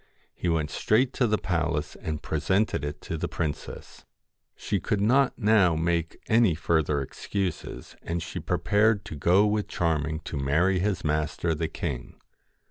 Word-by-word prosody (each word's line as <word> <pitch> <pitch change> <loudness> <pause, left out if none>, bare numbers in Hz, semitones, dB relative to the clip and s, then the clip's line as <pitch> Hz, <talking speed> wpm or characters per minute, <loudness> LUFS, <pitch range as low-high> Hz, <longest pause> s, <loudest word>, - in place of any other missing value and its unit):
He 90 - -2
went 80 -2 0
straight 125 +4 +2
to 125 - +2
the 105 0 +2
palace 80 -5 -1
and 75 -1 -5
presented 95 +2 0
it 75 0 -5
to 80 - -4
the - - -2
princess. 75 -4 -5 0.5
She - - -2
could 105 - -1
not 125 +6 +3
now 105 -7 +4
make 85 0 -1
any 110 -6 +4
further 80 -3 +1
excuses, 95 +6 -4
and 85 0 -3
she - - -5
prepared 105 0 +2
to - - -7
go 90 +8 +4
with 105 0 0
Charming 80 -2 -1
to 80 - -5
marry 80 +8 +2
his 100 0 -1
master, 75 +2 0
the 80 +1 -1
king. 75 -5 -5
85 Hz, 155 wpm, -27 LUFS, 75-105 Hz, 0.5 s, now